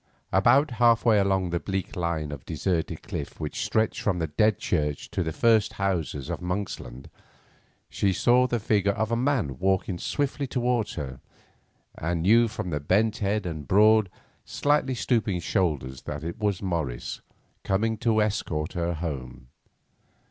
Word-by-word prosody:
About 140 +1 +4
half 115 -1 +5
way 110 -3 +5
along 95 -2 +1
the 85 - 0
bleak 95 0 -4
line 85 -4 -2
of 70 -3 -7
deserted 85 +2 -2
cliff - - -6
which - - -3
stretched 110 0 0
from 95 -4 0
the 85 - 0
Dead 105 +6 +2
Church 75 -4 -2
to 100 -2 -1
the 80 -2 -1
first 110 +3 +3
houses 85 -8 -2
of - - -4
Monksland, 90 -9 -4 0.8
she 100 - 0
saw 125 +6 +3
the 120 -2 -1
figure 100 -2 +1
of 110 +2 -2
a - - +2
man 115 - 0
walking 95 -1 0
swiftly 140 - -2
towards 120 -4 0
her, 65 -5 -5 0.8
and 80 0 -2
knew 115 +5 +5
from 110 -5 -5
the 75 - -1
bent 105 +9 +1
head 105 0 -1
and 80 -4 -5
broad, 105 0 +5 0.3
slightly 145 -3 +1
stooping 115 -6 0
shoulders 75 - -1
that 75 0 -6
it 85 +4 -5
was 105 -3 -1
Morris 80 -10 -3 0.4
coming 110 +4 +1
to 110 -2 +3
escort 90 -6 -2
her 85 -1 -1
home. 65 -6 -6
95 Hz, 155 wpm, -26 LUFS, 80-110 Hz, 0.8 s, half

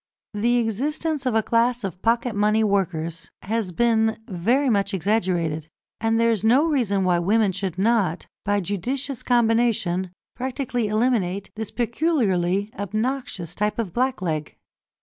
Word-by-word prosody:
The 235 +4 +2
existence 275 +6 -1
of 245 - +1
a 220 - +3
class 235 +1 +1
of 185 -2 -5
pocket 235 +1 +1
money 210 +2 +3
workers 180 -5 -1
has 215 -2 -2
been 220 +2 +2
very 235 +9 +1
much 200 -3 +1
exaggerated, 175 -5 0 0.3
and 225 +1 +1
there 230 0 +4
is 220 -2 -1
no 250 +7 +5
reason 235 -11 +1
why 180 -2 +2
women 205 +3 +2
should 190 -2 -4
not, 195 -5 +1 0.2
by 205 0 +1
judicious 250 - -3
combination, 225 -6 +2 0.3
practically 255 -3 -2
eliminate 210 -4 0
this 220 0 -4
peculiarly 215 - 0
obnoxious 215 - -3
type 210 +3 -1
of 220 -7 -3
blackleg. 180 - -1
220 Hz, 135 wpm, -23 LUFS, 190-240 Hz, 0.3 s, no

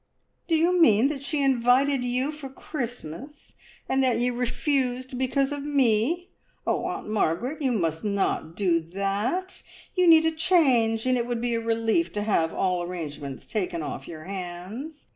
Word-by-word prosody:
"Do 330 - +2
you 345 +2 +3
mean 230 -2 +5
that 290 -3 -4
she 285 +1 -1
invited 260 +1 +3
you 250 +4 0
for 300 -3 -8
Christmas, 260 - -7 0.3
and 265 0 +2
that 255 -3 +2
you 245 +1 +1
refused 255 +1 -1
because 270 +2 0
of 285 -1 -4
me? 285 - +1 0.3
Oh, - - 0
Aunt - - -4
Margaret, 215 - -1
you 265 -3 +1
must 165 -6 -1
not 200 -5 -1
do 180 -4 +2
that! 200 - -2 0.3
You 365 -1 +3
need 320 -1 +7
a 320 - +3
change, 260 -10 +3
and 255 -1 +2
it 235 - -2
would 240 -1 -2
be 240 0 -1
a 230 - 0
relief 230 +8 +1
to 205 - -2
have 165 -6 +1
all 180 -2 0
arrangements 150 -6 -6
taken 180 -6 -2
off 140 -2 -6
your 155 -2 -8
hands. 195 - -7
245 Hz, 165 wpm, -26 LUFS, 195-280 Hz, 0.3 s, need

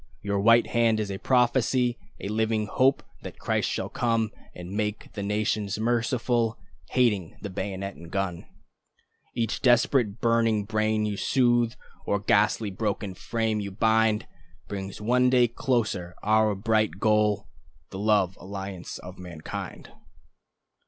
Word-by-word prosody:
Your 100 0 0
white 115 +3 +5
hand 115 -2 +2
is 105 -2 -2
a 95 - -5
prophecy, 125 0 +2 0.2
A - - -5
living 110 +1 0
hope 130 +5 +2 0.2
that - - -9
Christ - - 0
shall - - -2
come 115 -2 0 0.2
And 90 0 -8
make 105 +1 -3
the 105 - -5
nations 105 0 -1
merciful, 120 0 0 0.3
Hating 105 -9 +1
the 100 - -5
bayonet 95 +1 -4
and 85 0 -11
drum. 95 -2 -3 0.9
Each 115 -2 -1
desperate 120 -3 +3
burning 115 -3 +2
brain 110 0 +1
you 105 -1 -2
soothe, 120 -2 +2 0.3
Or 100 - 0
ghastly 105 +1 +2
broken 100 0 -2
frame 110 +2 -1
you 100 -1 -4
bind, 110 +1 +2 0.4
Brings 95 -1 -6
one 125 +3 +3
day 125 -2 +3 0.2
nearer 100 -8 0
our 110 0 +3
bright 110 -3 +1
goal, 105 -1 +2 0.4
The 95 - -6
love 100 -3 +2
alliance 95 -1 -6
of 90 0 -11
mankind. 85 -3 -7
110 Hz, 135 wpm, -26 LUFS, 100-115 Hz, 0.9 s, white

